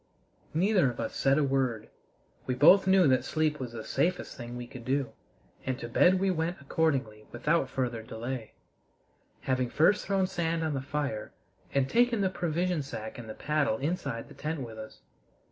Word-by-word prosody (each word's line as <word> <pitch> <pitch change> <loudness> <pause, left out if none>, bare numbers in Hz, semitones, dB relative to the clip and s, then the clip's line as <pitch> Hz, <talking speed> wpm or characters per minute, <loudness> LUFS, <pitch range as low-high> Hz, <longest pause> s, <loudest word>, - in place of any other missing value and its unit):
Neither 185 -3 +3
of 120 - -7
us - - -3
said 135 +1 +3
a 155 - +3
word. 130 -5 0 0.6
We 125 - 0
both 190 +8 +7
knew 190 -3 +6
that 130 -1 +3
sleep 155 -1 0
was 125 -3 -5
the 110 -1 -6
safest 180 +9 -1
thing 120 -1 -7
we 120 - -5
could 120 0 -10
do, 130 -1 0 0.5
and 130 -1 -2
to 120 - -6
bed 180 +10 +4
we 195 0 +2
went 170 +1 -2
accordingly 135 -8 -1
without 140 +3 +1
further 120 -4 -2
delay, 115 +1 -6 0.9
having 130 -2 0
first 160 +10 +3
thrown 195 -2 +2
sand 165 -3 -1
on 155 -2 -1
the 135 - -2
fire 140 -5 -3 0.4
and 135 -1 +2
taken 235 - +3
the 190 -1 +1
provision 175 -1 -1
sack 110 -5 -7
and 115 -2 -9
the 110 - -6
paddle 150 -6 0
inside 140 -5 -3
the - - -13
tent 155 0 -4
with 115 -3 -7
us. 110 0 -10
140 Hz, 180 wpm, -29 LUFS, 120-170 Hz, 0.9 s, both